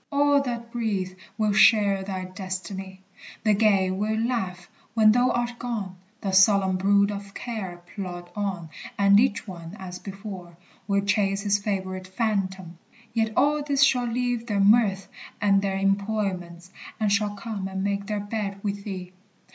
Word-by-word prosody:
All 285 0 +4
that 235 -3 -4
breathe 200 -6 -2 0.2
Will 215 -2 +1
share 205 -2 +5
thy 190 -1 -4
destiny. 190 0 -6 0.4
The 215 -1 +4
gay 200 -3 +3
will 210 +3 -1
laugh 205 -7 -2 0.3
When 215 -1 +6
thou 245 +3 +3
art 240 0 -1
gone, 210 -7 -4 0.2
the 195 - -2
solemn 190 0 +5
brood 200 +2 +3
of 200 -1 -7
care 190 -7 -5
Plod 175 -3 -6
on, 190 -6 -3 0.3
and 200 0 +6
each 225 -2 +1
one, 170 -1 -8
as 180 -1 -7
before, 190 -4 -8 0.3
will 200 -1 +2
chase 200 -1 +1
His 205 0 +2
favorite 190 -2 -3
phantom; 190 -4 -2 0.3
yet 225 -1 +1
all 295 +1 +3
these 285 -1 +2
shall 250 -3 +3
leave 240 0 -1
Their 205 -2 0
mirth 200 -2 +4 0.3
and 195 -1 +3
their 195 -1 -1
employments, 195 -3 -1 0.3
and 215 -2 +1
shall 205 0 +1
come 200 -2 -5
And 190 0 -4
make 200 0 -1
their 210 -1 -1
bed 205 -1 -4
with 200 -1 -3
thee. 185 -3 -6
200 Hz, 155 wpm, -25 LUFS, 190-220 Hz, 0.4 s, When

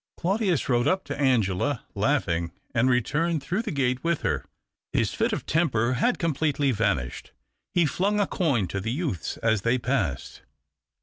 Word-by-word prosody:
Claudius 190 -2 0
rode 120 0 +2
up 190 +4 +2
to 140 0 -5
Angela, 120 0 +1
laughing, 100 - 0 0.2
and 120 +1 +3
■eturned 150 +7 +1
throuoh 185 +9 -1
the 220 - -3
i^ate 130 -3 0
with 170 -1 0
her. - - -1 0.5
His - - +1
fit - - 0
>f - - -3
temper 130 -7 +1
had 240 - +1
completely 150 -3 +1
vanished. 100 - -1 0.4
He 175 -2 +4
flung 200 +7 +1
I 205 - +3
coin 140 - 0
to 100 - -2
the 110 +4 -3
youths 135 - -3
as 110 -3 +2
they 115 +4 +2
passed. 120 - -2
135 Hz, 165 wpm, -26 LUFS, 115-165 Hz, 0.5 s, He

